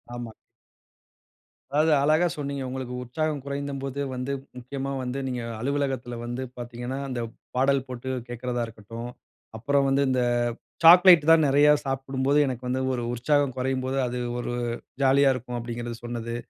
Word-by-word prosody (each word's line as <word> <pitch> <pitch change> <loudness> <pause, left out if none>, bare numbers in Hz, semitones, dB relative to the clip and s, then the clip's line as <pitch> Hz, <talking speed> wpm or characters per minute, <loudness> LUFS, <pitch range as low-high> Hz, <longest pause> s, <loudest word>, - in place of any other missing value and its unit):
ஆமா. 120 -2 -6 1.4
அதாவது 155 +2 +3
அழகா 155 +4 +4
சொன்னீங்க. 140 -1 -3
உங்களுக்கு 130 -1 -5
உற்சாகம் 150 +3 -2
குறைந்தபோது 140 -1 -4 0.2
வந்து 125 +2 -3 0.3
முக்கியமா 135 +2 -5
வந்து 125 +2 -3
நீங்க 125 -1 -3 0.2
அலுவலகத்தில 135 -2 -2
வந்து 120 +2 -4
பார்த்தீங்கனா, 120 +2 -5
அந்த 125 - -3 0.4
பாடல் 135 +1 +2
போட்டு 125 +1 -6 0.2
கேட்கிறதா 120 0 -3
இருக்கட்டும், 115 +2 -8 0.5
அப்புறம் 140 +4 +2
வந்து, 140 +1 +3
"இந்த 130 -1 +2 0.6
சாக்லேட் 175 -2 +9
தான் 160 -2 +6
நிறைய 145 +2 +5 0.2
சாப்பிடும்போது, 135 +1 0
எனக்கு 125 -1 -4
வந்து 130 +1 0
ஒரு 120 - -3
உற்சாகம் 140 +2 +1
குறையும்போது 130 +1 -1
அது 125 +1 -3 0.2
ஒரு 120 0 -3 0.5
ஜாலியா 135 +1 +5
இருக்கும்." 125 0 -5
அப்படிங்கிறது 120 0 -5
சொன்னது. 120 -1 -4
130 Hz, 135 wpm, -26 LUFS, 120-140 Hz, 1.4 s, சாக்லேட்